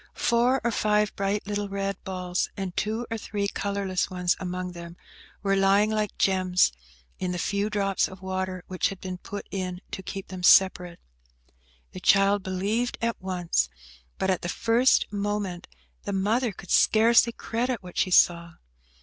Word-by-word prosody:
Four 245 +2 +2
or 235 - +1
five 210 -2 +1
bright 200 +1 -1
little 205 0 -3
red 195 0 -3
balls, 180 -1 -2
and 190 -3 -4
two 220 +3 -1
or 225 - -2
three 205 -1 -2
colourless 200 -2 -2
ones 180 -1 0
among 180 0 -4
them, 170 0 -10 0.5
were 195 -1 +2
lying 195 +2 +3
like 215 -1 -2
gems 185 - +3 0.5
in 185 - -2
the - - -3
few 200 +4 -1
drops 195 -2 +1
of 190 - -12
water 185 -1 -3
which 185 -1 -1
had 195 - -8
been 185 -1 -6
put 205 +2 -7
in 185 -2 -3
to - - -5
keep 195 +1 -7
them 185 -1 -7
separate. 180 -1 +4 0.9
The - - -8
child 195 +1 +4
believed 200 +6 -1
at 230 -2 -2
once, 175 - 0 0.5
but 190 - +1
at 185 - -1
the 175 - -4
first 235 +6 +3
moment 200 -3 -3 0.3
the 200 - -4
mother 220 +5 +1
could 185 -1 -11
scarcely 230 +2 +5
credit 235 -1 -3
what 180 -1 -11
she - - +2
saw. 170 -2 +4
195 Hz, 165 wpm, -26 LUFS, 185-210 Hz, 0.9 s, scarcely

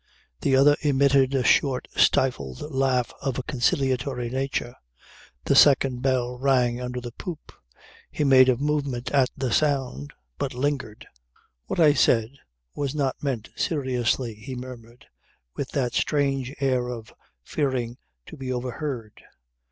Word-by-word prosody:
The 135 - +2
other 145 +2 +6
emitted 140 -2 +3
a 130 - +1
short 130 -1 +2
stifled 70 - +1
laugh 130 -2 +1
of 135 -3 -2
a 130 - -3
conciliatory 130 -2 -1
nature. 130 -2 -2 0.7
The - - +2
second 135 -3 +5
bell 125 -2 0
rang 125 -2 +2
under 125 0 -4
the 120 -1 -7
poop. 165 +6 -8 0.6
He - - -2
made 130 -2 +6
a 125 - +3
movement 140 -3 -2
at 135 -3 +3
the 130 -3 -2
sound, 130 - 0 0.3
but - - -3
lingered. 130 -5 -3 0.6
"What - - -3
I 155 -3 +6
said 115 -4 +3 0.4
was 140 0 -3
not 140 -3 -1
meant 130 -7 -3
seriously," 125 -5 -1
he 115 +5 -8
murmured, 125 -1 -10 0.5
with 135 - -4
that 125 -4 -1
strange 135 -3 0
air 130 -3 +1
of 115 -3 -7 0.3
fearing 125 - -2 0.3
to - - -11
be 130 -2 -5
overheard. 125 -2 -5
130 Hz, 135 wpm, -25 LUFS, 125-140 Hz, 0.7 s, other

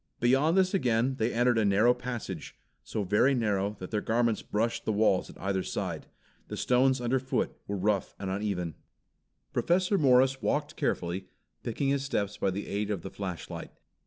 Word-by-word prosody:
Beyond 135 +8 +3
this 185 0 +3
again 130 - +1
they 115 +2 +1
entered 120 0 +3
a - - +3
narrow 105 +4 +4
passage, 120 -10 -6 0.3
so 105 - -3
very 105 +8 +3
narrow 105 -3 0
that 90 - -8
their 105 -2 0
garments 115 -1 +1
brushed 115 +3 -1
the - - 0
walls 105 -3 +2
at - - -13
either 95 0 0
side. - - -4 0.4
The - - -6
stones 130 +1 +3
underfoot 130 +2 0
were 100 - -2
rough 100 0 0
and 95 -1 -4
uneven. 95 -4 -2 0.8
Professor 185 +3 +2
Morris 130 -1 +4
walked 150 0 -1
carefully, 90 +2 -2 0.3
picking 135 +4 -1
his 140 -1 +1
steps 105 -7 -1
by - - 0
the 100 +2 -3
aid 105 +1 -2
of 100 -5 -2
the 95 - -6
flashlight. 95 -4 -6
110 Hz, 170 wpm, -29 LUFS, 100-130 Hz, 0.8 s, narrow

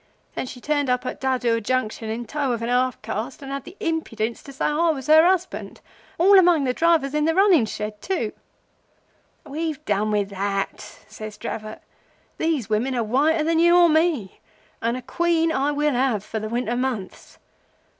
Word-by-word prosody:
Then - - -4
she 250 - -9
turned 290 0 0
up 250 0 0
at - - -5
Dadur 245 -3 +1
Junction 225 -1 -2
in 230 +2 -4
tow 275 +1 -1
of 230 -1 -4
a - - -2
half 250 0 +1
caste, 225 +6 -5
and 275 - -7
had 275 -1 -5
the 385 - -12
impidence 235 -9 -2
to 275 - -11
say 270 - -3
I 320 +3 +2
was 275 -5 -2
her 315 +1 +7
husband—all 370 +1 +1
among 345 -5 +4
the 255 -2 0
drivers 320 -3 +2
of 300 0 +1
the 325 +1 +1
running 375 - +5
shed!' 215 - -4 1.1
"'We've 305 0 -4
done 210 +1 0
with 205 -2 0
that,' 200 +1 -4
says 215 0 -9
Dravot. 215 -2 -6 0.6
'These 315 -8 0
women 230 +5 0
are 235 - 0
whiter 290 +8 +2
than 325 +1 +1
you 345 +1 +5
or 345 -1 +6
me, 310 - +1 0.4
and 235 +2 0
a 255 - -8
Queen 330 +4 +1
I 280 0 +1
will 295 0 +1
have 245 -5 +1
for 220 +1 -4
the 215 0 -5
winter 240 0 -1
months. 245 -7 -4
260 Hz, 180 wpm, -23 LUFS, 225-315 Hz, 1.1 s, her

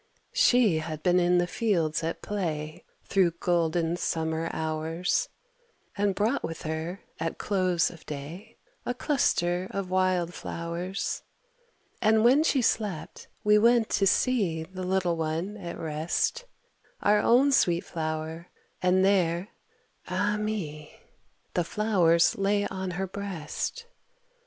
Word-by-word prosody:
She 225 -10 +4
had 155 -1 -6
been 180 0 +4
in 180 0 +3
the 175 - +3
fields 175 -6 0
at 165 - -3
play 155 -7 -3 0.2
Through 185 -4 +2
golden 170 -1 +1
summer 160 -1 -1
hours, 160 - -1 0.7
And 200 -1 +1
brought 225 +7 0
with 165 - -5
her, 160 +4 -4 0.2
at 165 0 -3
close 185 -4 +1
of 165 - -14
day, 160 +10 -8 0.3
A 245 - -2
cluster 185 - +1
of 195 -2 -4
wild 185 -2 +1
flowers. 170 +5 -4 0.8
And 220 0 +4
when 260 +5 +6
she 280 -5 +2
slept, 200 -9 -2 0.2
we 210 0 +5
went 235 0 +4
to 195 - +3
see 190 -9 +1
The 185 +3 -9
little 180 -2 0
one 165 +5 -2
at 175 -4 -6
rest, 160 - -1 0.6
Our 210 0 +4
own 260 +6 +4
sweet 175 -9 +3
flower, 160 +1 -4 0.3
and 185 +1 +3
there, 185 -1 +2 0.6
ah, 205 +3 0
me! 180 -9 -4 0.5
The 175 - +1
flowers 175 -3 +3
lay 205 +1 +2
on 190 -1 -4
her 190 - -1
breast. 200 - -5
180 Hz, 130 wpm, -27 LUFS, 165-205 Hz, 0.8 s, when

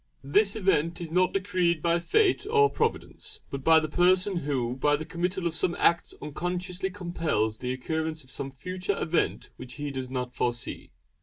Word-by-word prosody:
This 200 +9 +3
event 175 -5 +1
is 170 -2 -6
not 180 +2 +3
decreed 185 -4 +1
by 170 0 +3
Fate 400 - +2
or 425 -1 +5
Providence, 435 -1 -3
but 140 -1 -5
by 160 +1 +7
the 155 - -2
person 180 +4 +3
who 130 -6 -1
by 145 +3 +2
the 155 +2 -5
committal 180 +2 -2
of 170 - 0
some 170 +1 0
act 170 - +2
unconsciously 180 +5 -3
compels 165 - -1
the 125 0 -2
occurrence 160 +4 -3
of 130 - -12
some 135 +1 -4
future 185 +8 -3
event 170 0 0
which 125 - -8
he 145 -1 -4
does 130 -2 -4
not 125 -1 -3
foresee. 120 -1 -2
170 Hz, 175 wpm, -27 LUFS, 140-185 Hz, -, by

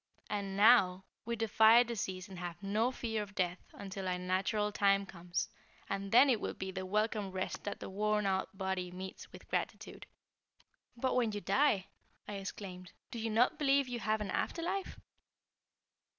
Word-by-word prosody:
And 200 -2 -2
now, 200 -4 +6 0.2
we 235 +1 -1
defy 225 +1 +6
disease 195 -6 -4
and 190 -3 -9
have 175 +2 -6
no 215 +5 +1
fear 225 -4 -2
of 205 -1 -8
death 180 -2 0
until 195 -1 -6
our 180 0 0
natural 190 +4 0
time 200 -1 +3
comes, 175 -2 -3 0.4
and 195 0 -3
then 255 +5 +8
it 240 -6 +2
will - - -3
be 190 0 -4
the 185 0 -5
welcome 210 0 0
rest 185 0 -4
that 205 - -4
the - - -6
worn 210 +1 0
out 190 0 -1
body 190 -2 -2
meets 185 +1 -8
with - - -13
gratitude." - - -4 0.9
"But 260 +2 0
when 235 -4 +2
you 205 - -2
die," 220 -9 +2 0.4
I 205 - -4
exclaimed, 185 -2 -7 0.2
"do 235 - -5
you 225 0 -2
not 230 +3 +3
believe 275 -2 +3
you 245 -1 -3
have 215 -1 0
an 200 -3 -3
after 335 - -1
life?" 390 +3 -3
200 Hz, 175 wpm, -34 LUFS, 190-225 Hz, 0.9 s, then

